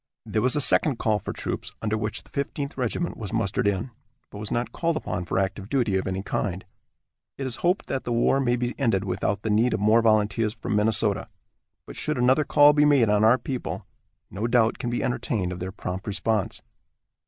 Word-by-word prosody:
There 110 -1 -1
was 125 +4 +2
a 145 - +1
second 140 -1 +4
call 110 -2 +1
for - - -5
troops, - - -5
under 110 -1 -1
which 105 0 -3
the - - -23
Fifteenth 140 0 -3
Regiment 130 +7 -2
was 105 -2 -6
mustered 110 0 0
in, 100 +5 -1 0.4
but 100 - -9
was 105 -1 -5
not 120 +1 -2
called 165 -1 -1
upon 90 -11 -4
for - - -2
active 95 +1 -2
duty 120 -8 +1
of 95 - -1
any 95 0 -3
kind. 95 -2 -3 0.7
It 135 - -4
is 130 - -2
to - - -14
be - - 0
hoped 180 +2 +1
that 135 - -3
the 120 - -4
war 120 +3 +3
may 120 -3 +2
be 120 0 -2
ended 115 -8 +1
without 95 +1 -2
the 110 - -1
need 115 +4 +3
of - - -3
more 110 +3 +4
volunteers 110 0 +2
from 110 -2 -3
Minnesota, 105 0 +1 0.6
but - - -10
should - - -2
another 130 +4 +3
call 145 0 +6
be 150 0 +4
made 140 -7 +4
on 105 0 +3
our 115 +3 +6
people 130 -1 -5 0.5
no 105 +5 -2
doubt 120 -2 +2
can 120 - -2
be 120 - -2
entertained 110 -7 -1
of 90 - -6
their 90 +1 -4
prompt 95 +2 -6
response. 105 0 -1
110 Hz, 220 wpm, -25 LUFS, 100-125 Hz, 0.7 s, call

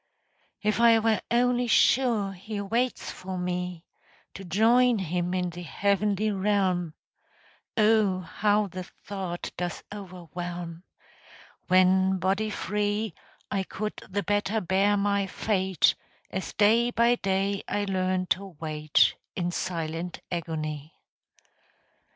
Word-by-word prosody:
If 215 +1 +1
I 235 -1 +7
were 225 -1 +2
only 245 +1 +2
sure 230 -4 +3
He 205 +3 -6
waits 230 +5 -1
for 185 0 -6
me 180 -1 -3 0.5
To 195 - -8
join 230 +6 +4
him 180 -1 -1
in 180 -1 -1
the 175 +1 -8
heavenly 200 +4 0
realm 190 -4 0 0.8
(Oh, 210 -4 +3
how 205 +4 +1
the 185 -1 -6 0.2
thought 190 -3 -4
does 175 -1 -3
overwhelm) 175 -3 -7 0.9
When 185 +1 +4
body 195 +4 0
free, 210 +1 -1 0.4
I 195 - +1
could 210 +3 -4 0.2
the 200 +1 -1
better 205 +3 0
bear 195 +2 +2
my 200 0 +1
fate, 190 -2 +1 0.4
As 190 - -4
day 225 +3 +4
by 235 0 +3
day 195 0 0
I 205 0 -1
learn 185 -1 0
to 190 -3 -1
wait 155 -2 +2 0.2
In 175 -1 -1
silent 170 -1 -3
agony. 155 -3 -4
195 Hz, 115 wpm, -27 LUFS, 180-210 Hz, 0.9 s, I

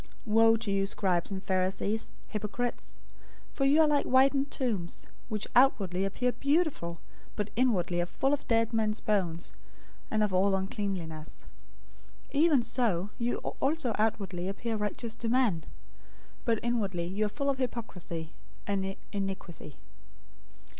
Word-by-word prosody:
023:027 215 - -3
"Woe 225 0 +7
to 220 -2 -2
you, 195 0 +2
scribes 185 -4 0
and 190 0 -4
Pharisees, 190 +3 0 0.2
hypocrites! 220 +3 -3 0.6
For 275 - +1
you 290 +4 +6
are 315 - +6
like 290 -1 +2
whitened 270 +2 +4
tombs, 210 -12 -2 0.2
which 215 -2 -1
outwardly 195 -8 +4
appear 250 +6 0
beautiful, 280 - 0 0.4
but 210 0 -2
inwardly 185 -8 +2
are 175 - -1
full 270 +10 +1
of 290 - -2
dead 230 0 +2
men's 215 -1 +1
bones, 175 -5 0 0.6
and 215 -1 +2
of 205 -3 0
all 195 +1 +4
uncleanness. 190 -5 -4 0.9
023:028 285 - +3
Even 295 -7 +5
so 210 -7 0
you 240 0 0 0.2
also 275 -4 +1
outwardly 190 -5 0
appear 225 +4 -2
righteous 215 +2 -2
to 230 0 -3
men, 230 -10 +2 0.8
but 230 -3 +2
inwardly 200 -8 0
you 200 +4 0
are - - -5
full 280 +5 0
of 265 - -5
hypocrisy 180 -10 -4 0.3
and 195 -1 -1 0.2
iniquity. 195 -6 -5
210 Hz, 140 wpm, -30 LUFS, 190-245 Hz, 0.9 s, Woe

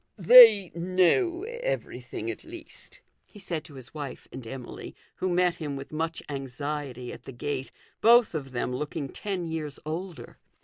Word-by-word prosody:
" - - -48
They 215 -1 +9
know 185 - +2
everything 485 +2 -4
at - - -10
least," - - -10 0.2
he - - -18
said 170 -6 -4
to 145 - -13
his 130 -1 -12
wife 145 -3 -7
and 125 -3 -8
Emily, 130 +1 -8 0.2
who 185 - -1
met 180 -1 +2
him 145 -3 -4
with 135 0 -8
much 165 +1 -2
anxiety 135 -2 -5
at 120 - -12
the - - -7
gate, 135 +1 -4 0.3
both 235 -2 +6
of 145 -4 -4
them 125 0 -2
looking 150 +1 -4
ten 190 0 -4
years 160 -3 -4
older. 170 +3 -6
160 Hz, 165 wpm, -27 LUFS, 135-190 Hz, 0.3 s, They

